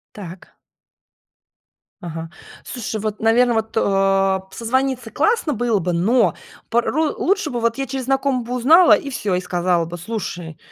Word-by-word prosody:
Так. 185 -3 -11 1.5
Ага. 165 -1 -6 0.3
Слушай, 225 -3 -5
вот, 215 0 -4
наверное, 235 +2 +3
вот, 220 0 -2
э, 195 -2 +2
созвониться 250 +1 -2
классно 420 0 +1
было 235 -2 0
бы, 180 -1 -2
но 190 +2 +2 0.3
порой 285 +6 0
лучше 390 -3 0
бы 240 -2 -3
вот 230 +2 0
я 270 - -2
через 260 -1 -5
знакомых 270 -2 0
бы 250 - -3
узнала 315 +9 +6
и 285 - -6
всё, 210 -8 -2
и - - -1
сказала 175 -1 0
бы: 170 +2 -7
"Слушай, 175 -4 -6
225 Hz, 150 wpm, -20 LUFS, 185-260 Hz, 1.5 s, узнала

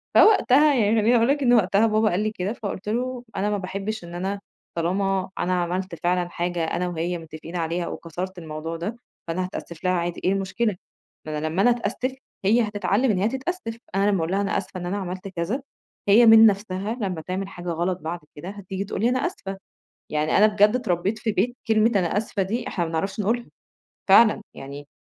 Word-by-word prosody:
فوقتها 295 - +6
يعني 220 -3 +3
خلّيني 230 +4 +4
أقول 230 0 +4
لك 285 +1 +2
إن 245 -1 +5
وقتها 205 0 +4
بابا 215 0 +3
قال 180 +1 0
لي 215 0 0
كده 200 +1 -3
فقُلت 205 -2 -5
له: 250 +2 -2
"أنا 205 +2 0
ما 210 - 0
باحبش 195 +2 -4
إن 170 0 -9
أنا، 195 +3 -2 0.4
طالما 190 +3 0
أنا 180 0 +1
عملت 180 +1 -3
فعلًا 175 0 +1
حاجة 175 -1 -2
أنا 175 +2 -1
وهي 175 +1 -2
متّفقين 160 +1 -9
عليها 170 +1 -1
وكسرت 180 +3 -6
الموضوع 160 0 -5
ده، 200 +7 -4 0.3
فأنا 175 +3 -1
هتأسِّف 170 -2 -8
لها 185 - +2
عادي 175 -1 -2
إيه 185 - +3
المشكلة؟ 195 +2 -1 0.5
ما 155 -1 -3
أنا 155 +1 -2
لمّا 165 +5 0
أنا 245 - +5
أتأسّف، 245 +3 -2 0.3
هي 225 +5 +5
هتتعلمّ 210 +4 +1
إن 200 - 0
هي 205 - +2
تتأسّف، 265 -1 -4 0.2
أنا 200 +1 +3
لمّا 200 - +2
أقول 160 +1 -1
لها 195 +1 +1
أنا 200 - 0
أسفة 185 -1 -5
إن 175 - -5
أنا 190 +3 -2
عملت 185 0 -5
كذا، 190 +8 -2 0.5
هي 215 +4 +7
من 225 0 +9
نفسها 200 0 +1
لمّا 185 -5 -2
تعمل 185 +4 -3
حاجة 175 -2 -7
غلط 175 +2 -1
بعد 165 +2 -4 0.2
كده 160 +5 -7
هتيجي 195 -1 -5
تقول 200 - -4
لي 235 - +4
أنا 255 +1 +1
آسفة." 195 - -5 0.5
يعني 150 0 +1
أنا 210 - +7
بجد 210 +1 +4
اتربّيت 195 -3 0
في 220 0 0
بيت 215 +6 0
كلمة 220 +1 +4
أنا 185 0 +1
آسفة 210 -1 -1
دي 230 +6 -3
إحنا 175 - -1
ما - - -5
بنعرفش 190 +5 -2
نقولها، 230 +4 0 0.6
فعلًا 215 +2 +7
يعني 140 +1 -9
195 Hz, 205 wpm, -24 LUFS, 175-220 Hz, 0.6 s, من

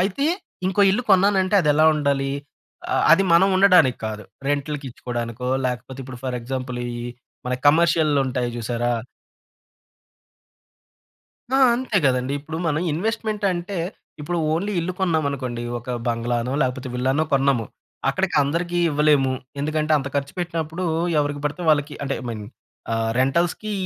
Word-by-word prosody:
అయితే 200 +10 0 0.4
ఇంకో 190 +2 +1
ఇల్లు 210 +6 0
కొన్నానంటే 190 0 +4
అదెలా 150 -1 +3
ఉండాలి? 140 -2 0 0.6
ఆహ్, - - +2
అది 185 - +6
మనం 180 +4 +6
ఉండడానికి 180 -10 +5
కాదు. 105 -1 -5 0.2
రెంట్‌లుకి 145 0 -2
ఇచ్చుకోడానికో, 120 0 -5 0.2
లేకపోతే 125 +1 -5
ఇప్పుడు 125 -1 -9
ఫర్ 125 -1 -2
ఎగ్జాంపుల్ 125 0 -4
ఈహ్, 120 0 -5 0.4
మన 125 - 0
కమర్షియల్‌లో 155 -1 +4
ఉంటాయి 125 -2 -1
చూసారా? 120 +1 -1 2.6
ఆ! - - +4 0.2
అంతే 240 -4 0
గదండీ! 130 +1 +1
ఇప్పుడు 160 +2 -6
మనం 155 -1 +1
ఇన్వెస్ట్‌మెంట్‌ 215 +4 -2
అంటే 180 +2 -4 0.4
ఇప్పుడు 170 +4 -2
ఓన్లీ 195 +6 -1
ఇల్లు 175 +2 -2
కొన్నామనుకోండి. 140 -9 -1 0.2
ఒక 120 +2 -8 0.2
బంగ్లానో 120 +1 -1
లేకపోతే 130 +1 -2
విల్లానో 130 +4 +1
కొన్నాము. 135 -4 +2 0.5
అక్కడికందరికి 175 -1 0
ఇవ్వలేము. 145 -3 +3 0.3
ఎందుకంటే 155 +1 0
అంత 140 0 -4
ఖర్చు 140 0 -2
పెట్టినప్పుడూ, 165 0 -3 0.3
ఎవరికి 145 0 -2
బడితే 160 +5 -5
వాళ్ళకి 145 0 +1
అంటే, 135 0 -2
ఐ - - -8
మీన్ 110 -2 -6 0.5
ఆహ్, 115 0 0
రెంటల్స్‌కీ 170 +10 0
145 Hz, 130 wpm, -22 LUFS, 125-175 Hz, 2.6 s, అది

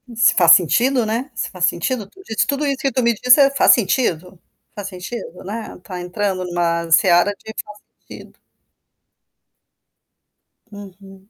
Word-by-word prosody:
Se 220 -2 +4
faz 170 -3 +5
sentido, 240 - +1
né? 230 +6 -3
Se - - -4
faz 180 -2 -1
sentido. 205 +5 -2
Tu 380 - -18
disso 220 - -1
tudo 285 +1 -1
isso 275 -1 -1
que 275 - 0
tu 255 +1 -1
me 235 0 +3
disse, 250 +5 +4
eh: 275 0 +4
"faz 280 - +4
sentido? 185 -6 -1 0.4
Faz 205 -2 -6
sentido", 185 0 -8
né? 215 +4 -7
Está 180 0 -9
entrando 185 +1 -3
em - - -8
uma 170 -1 -1
seara 175 +3 +4
de 220 - -11
"faz 210 0 -14 0.3
sentido". - - -13 2.3
Uhum. 195 -1 -14
205 Hz, 160 wpm, -19 LUFS, 180-240 Hz, 2.3 s, faz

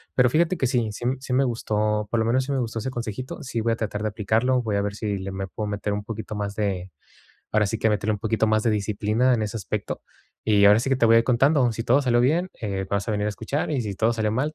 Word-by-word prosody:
Pero 125 -1 +5
fíjate 170 +5 +2
que 130 - 0
sí 120 -3 +1
sí 120 - -8
m 130 +1 +1
sí 130 -1 -5
me 135 +2 +4
gustó, 105 -3 -1
por 115 - 0
lo 110 - +1
menos 130 +3 +2
sí 140 - -4
me 135 - 0
gustó 115 -1 -3
ese 130 +4 -3
consejito, 120 +3 -5
sí 120 -3 -3
voy 115 0 +1
a - - -1
tratar 105 -2 -3
de - - +1
aplicarlo, 115 +4 +1
voy 105 -3 -1
a - - +1
ver 100 0 -3
si 105 -2 -2
le 95 +1 -5
me 95 0 -4
puedo 105 +2 -5
meter 105 0 -3
un 105 0 -3
poquito 110 -1 -6
más 100 -1 -3
de 95 -4 -2 0.6
ahora 105 -1 +3
sí 115 +3 -2
que 110 - +2
meterle 105 +1 0
un 105 - -5
poquito 110 +1 0
más 110 0 +2
de 115 - +2
disciplina 105 +4 +1
en 110 - 0
ese 105 +2 -3
aspecto. 105 0 -4 0.4
Y 105 -2 +4
ahora 105 +2 +7
sí 135 - -2
que 135 - +3
te 120 - +2
voy 115 0 +6
a - - +8
ir - - -3
contando, 130 +1 +3
si 115 +1 -4
todo 130 +4 +4
salió 120 -2 +3
bien, 170 +8 +2
eh, 95 -3 -3
vas 100 0 -1
a - - +1
venir 105 0 -1
a - - +1
escuchar 135 +10 -3
y 135 -5 0
si 100 -2 -4
todo 115 +4 +2
salió 110 -1 0
mal 145 +6 -1
110 Hz, 295 wpm, -24 LUFS, 105-125 Hz, 0.6 s, a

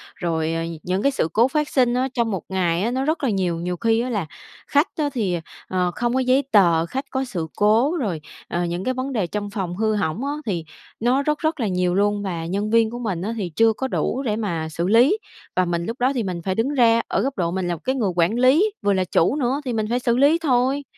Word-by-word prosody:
Rồi, 165 -2 -1
ờ, 165 - -1
nh 165 0 -5
những 185 +2 -1
cái 280 - +3
sự 265 - 0
cố 230 +3 +4
phát 300 +2 -1
sinh 250 -4 +2
á 255 +2 +1
trong 235 -2 0
một 190 -4 -3
ngày 180 -2 0
á 230 - 0
nó 260 +2 -1
rất 310 +1 -1
là 265 - +2
nhiều, 185 -5 0
nhiều 180 +1 -3
khi 225 +4 +2
á 250 - -3
là 205 -8 -1 0.4
khách 290 +5 +3
á 300 -2 0
thì, 200 -9 0 0.3
ờ, 180 -1 0
không 240 0 0
có 260 - +2
giấy 260 +2 +3
tờ, 170 -6 +4
khách 265 +9 -4
có 265 0 -1
sự 175 -10 -4
cố. 230 +11 +3
Rồi, 195 - -2 0.3
ờ, 175 +1 -1
những 175 +2 -3
cái 255 - 0
vấn 260 +1 -3
đề 200 -7 0
trong 205 +1 -4
phòng 190 -4 -4
hư 220 0 +1
hỏng 200 - -1
á 285 - -1
thì 175 -7 -2 0.3
nó 245 +4 +2
rất 300 +1 0
rất 315 -1 -1
là 230 - 0
nhiều 180 -1 0
luôn. 205 +1 +1
Và 170 -4 -3
nhân 200 +5 -2
viên 230 0 +4
của 240 +2 -6
mình 195 -8 -3
á 215 +5 -2
thì 190 -5 -3
chưa 225 0 +4
có 265 +5 -3
đủ 265 - -1
để 215 -5 0
mà 170 -8 -2
xử 170 +3 -2
lý, 245 - +5 0.4
và 185 - +3
mình 170 0 -2
lúc 235 +3 -5
đó 255 +2 +3
thì 240 - 0
mình 180 -3 -4
phải 185 +1 -2
đứng 230 +5 0
ra 230 -4 +4
ở - - 0
góc 270 +1 -2
độ 170 -3 0
mình 185 0 -2
là 175 - -1
một 160 - -14
cái 260 +1 0
người 215 -8 0
quản 175 +4 +2
lý, 300 +12 +4
vừa 200 - +2
là 190 -1 +1
chủ 170 +8 +2
nữa, 275 0 0
thì 250 - -2
mình 220 -1 0
phải 245 +1 +1
xử 240 -1 +1
lý 285 +5 +5
thôi, 265 0 +1
220 Hz, 270 wpm, -22 LUFS, 180-255 Hz, 0.4 s, lý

